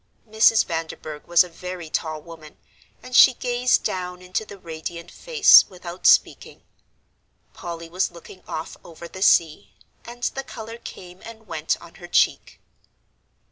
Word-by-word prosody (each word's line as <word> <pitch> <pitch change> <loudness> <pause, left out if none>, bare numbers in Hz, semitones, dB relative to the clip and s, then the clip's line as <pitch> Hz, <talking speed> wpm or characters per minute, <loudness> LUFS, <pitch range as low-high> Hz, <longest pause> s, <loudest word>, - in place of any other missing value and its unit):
Mrs. 220 0 +4
Vanderburgh 160 -2 -6
was 175 0 +5
a - - -9
very 180 0 -8
tall 155 -1 -4
woman, 160 -2 -13 0.5
and 255 -1 -7
she 255 - +8
gazed 245 0 +1
down 180 -1 -4
into 180 +4 -4
the 200 - -12
radiant 170 0 -8
face, 475 -4 +5
without 180 -1 -4
speaking; - - +2 0.9
Polly 170 -1 -8
was 180 +3 -1
looking 175 +2 -14
off 160 - -6
over 170 0 -11
the 190 - -11
sea, 165 -1 +2 0.3
and 240 +1 -12
the 270 - -5
colour 230 -2 -9
came 180 -4 -11
and 225 -1 -12
went 160 -4 -2
on 170 - -15
her 175 - -9
cheek. - - 0
180 Hz, 145 wpm, -23 LUFS, 165-220 Hz, 0.9 s, she